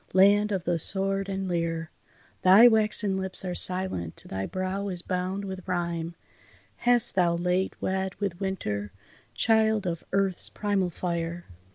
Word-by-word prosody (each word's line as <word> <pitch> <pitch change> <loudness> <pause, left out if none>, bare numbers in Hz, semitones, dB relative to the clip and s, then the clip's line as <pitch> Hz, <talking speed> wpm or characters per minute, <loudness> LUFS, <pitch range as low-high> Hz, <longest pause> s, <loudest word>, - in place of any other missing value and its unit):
Land 205 +3 +5
of 190 -4 -1
the 175 -1 0
sword 195 +3 -1
and 195 0 -3
lyre! 165 -2 -2 0.5
Thy 195 +6 +8
waxen 215 -3 +3
lips 190 0 -1
are 180 - -2
silent, 180 - 0
thy 95 0 -4
brow 185 +2 -3
is 180 -3 -4
bound 185 +2 -3
with 190 -1 -7
rime, 170 -2 -2 0.6
Hast 240 -1 +4
thou 175 -2 +2
late 180 +2 -1
wed 190 0 -2
with 195 -4 -4
winter, 105 - -3 0.4
child 220 - +2
of 170 -2 -3
earth's 195 -2 0
primal 200 -3 -1
fire? 170 0 -4
185 Hz, 145 wpm, -27 LUFS, 175-195 Hz, 0.6 s, Thy